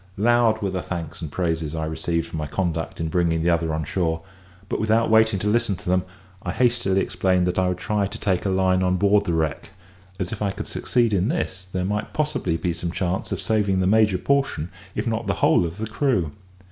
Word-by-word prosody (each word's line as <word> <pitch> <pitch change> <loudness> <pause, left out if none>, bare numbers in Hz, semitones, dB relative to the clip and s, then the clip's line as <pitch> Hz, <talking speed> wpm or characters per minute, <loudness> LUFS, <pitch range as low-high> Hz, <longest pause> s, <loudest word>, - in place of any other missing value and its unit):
Loud 115 0 +3
were 100 - 0
the 95 -1 -2
thanks 85 -4 -6
and 80 -3 -5
praises 80 -3 -1
I 80 -1 -2
received 80 +1 -1
for - - -9
my 75 -2 -2
conduct 80 0 -2
in 80 - -1
bringing 80 -1 +1
the 85 - +3
other 85 -1 +1
on 80 0 -1
shore; 80 0 -1 0.4
but - - -2
without 110 +1 +2
waiting 110 -2 +5
to 100 - -2
listen 110 -1 +2
to - - -12
them, 90 0 +2 0.4
I 90 - -3
hastily 115 -6 +2
explained 90 -2 +1
that 90 +1 0
I 95 - +2
would 90 -1 -1
try 105 +1 0
to 110 +3 -8
take 95 -4 0
a 100 - 0
line 95 -1 +2
on 90 0 +2
board 100 +2 +3
the 85 - 0
wreck, 80 +1 -1 0.5
as, 95 -1 -2
if 110 - -5
I 105 - +1
could - - -5
succeed 120 -3 +1
in 95 0 +2
this, 95 - -2
there 90 -1 -1
might 105 +2 -2
possibly 150 - 0
be 85 +1 -1
some 85 +1 -3
chance 90 +2 -2
of 95 - -2
saving 100 -1 +1
the 95 - +2
major 105 -1 +4
portion, 135 - 0 0.2
if - - -2
not - - -2
the - - +1
whole 85 - +3
of 85 +3 -8
the 110 - -3
crew. 110 - 0
95 Hz, 230 wpm, -23 LUFS, 85-105 Hz, 0.5 s, waiting